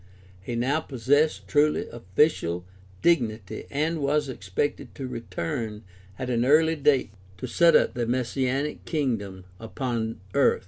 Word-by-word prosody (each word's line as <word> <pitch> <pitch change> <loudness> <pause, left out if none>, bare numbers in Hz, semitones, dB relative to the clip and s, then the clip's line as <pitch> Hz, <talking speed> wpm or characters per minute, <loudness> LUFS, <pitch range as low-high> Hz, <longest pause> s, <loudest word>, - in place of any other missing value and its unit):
He 120 +5 -5
now 130 +6 +1
pos 130 -7 -9
sessed 145 +3 +3
truly 150 +1 +2
official 95 - 0 0.4
dignity 115 - +1
and 155 +3 -1
was 145 0 +1
expected 95 +4 -3
to 135 - -5
return 115 -2 -4 0.3
at 130 - -4
an 120 -1 +2
early 160 +5 +4
date 145 -7 +2 0.3
to - - -5
set 170 -1 +4
up - - +4
the 120 -1 -2
messianic 130 +4 -1
kingdom 105 - -2
upon 115 -1 -3
earth. 140 - +4
130 Hz, 135 wpm, -26 LUFS, 115-150 Hz, 0.4 s, early